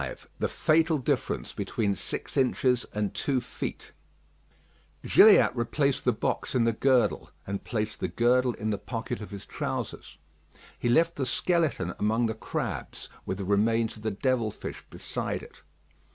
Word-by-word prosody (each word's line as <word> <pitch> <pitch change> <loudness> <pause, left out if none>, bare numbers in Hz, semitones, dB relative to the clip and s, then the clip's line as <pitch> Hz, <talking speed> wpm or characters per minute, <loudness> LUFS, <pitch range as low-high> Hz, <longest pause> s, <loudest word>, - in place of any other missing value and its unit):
V - - -4 0.2
THE - - +1
FATAL 160 0 +3
DIFFERENCE 130 - -1
BETWEEN 105 -3 -1
SIX - - -5
INCHES 125 -2 +2
AND 105 -1 -3
TWO 135 -3 0
FEET 125 - -6 1.1
Gilliatt - - +7
replaced 140 +3 0
the 125 - +5
box 110 - -2
in 125 - +4
the 115 0 +2
girdle, 130 +1 +2 0.2
and 100 0 -4
placed 110 -1 -3
the - - -1
girdle 125 +1 +2
in 110 -1 -2
the 100 - -2
pocket 115 -2 -4
of 105 - -7
his 100 -1 -8
trousers. - - -5 0.6
He 120 - 0
left 165 +7 +3
the 135 -2 -1
skeleton 160 - 0
among 110 +3 +2
the 110 - 0
crabs, 110 - -4 0.2
with 95 - -2
the 100 - -4
remains 110 +3 +2
of 110 - -13
the 110 - -1
devil 115 +2 0
fish - - -8
beside - - -4
it. - - -14
115 Hz, 160 wpm, -28 LUFS, 105-130 Hz, 1.1 s, Gilliatt